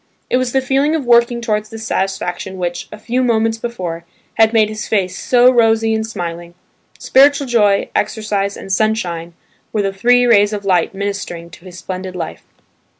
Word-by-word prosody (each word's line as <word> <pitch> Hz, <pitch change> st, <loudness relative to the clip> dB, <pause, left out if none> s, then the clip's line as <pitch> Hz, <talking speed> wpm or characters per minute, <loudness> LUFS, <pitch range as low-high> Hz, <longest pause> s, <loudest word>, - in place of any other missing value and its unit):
It -, -, +3 dB
was 255 Hz, -1 st, -1 dB
the 265 Hz, -, +1 dB
feeling 275 Hz, +4 st, +1 dB
of 300 Hz, -5 st, -3 dB
working 235 Hz, 0 st, +3 dB
towards 215 Hz, -2 st, -2 dB
this 225 Hz, 0 st, -8 dB
satisfaction 190 Hz, -2 st, -3 dB
which, 175 Hz, -1 st, -4 dB
a 215 Hz, -, -8 dB
few 245 Hz, +4 st, -2 dB
moments 225 Hz, -2 st, +1 dB
before, 180 Hz, -8 st, -5 dB, 0.3 s
had 220 Hz, 0 st, +4 dB
made 220 Hz, -2 st, +3 dB
his 215 Hz, 0 st, -6 dB
face 185 Hz, -4 st, 0 dB
so 250 Hz, +3 st, +4 dB
rosy 225 Hz, -2 st, +3 dB
and 220 Hz, 0 st, 0 dB
smiling; 175 Hz, -5 st, -6 dB, 0.4 s
spiritual 280 Hz, +1 st, +4 dB
joy, 210 Hz, -5 st, +2 dB
exercise, 200 Hz, -2 st, -1 dB
and 195 Hz, -, -8 dB
sunshine, 175 Hz, -6 st, -1 dB, 0.4 s
were 210 Hz, -, 0 dB
the 195 Hz, 0 st, -1 dB
three 245 Hz, +5 st, +3 dB
rays 205 Hz, -3 st, +4 dB
of 205 Hz, -1 st, -5 dB
light 185 Hz, -1 st, +1 dB
ministering 195 Hz, -4 st, -5 dB
to 175 Hz, -, -15 dB
his 180 Hz, -1 st, -11 dB
splendid 185 Hz, 0 st, -6 dB
life. 160 Hz, -, -6 dB
215 Hz, 175 wpm, -17 LUFS, 185-235 Hz, 0.4 s, had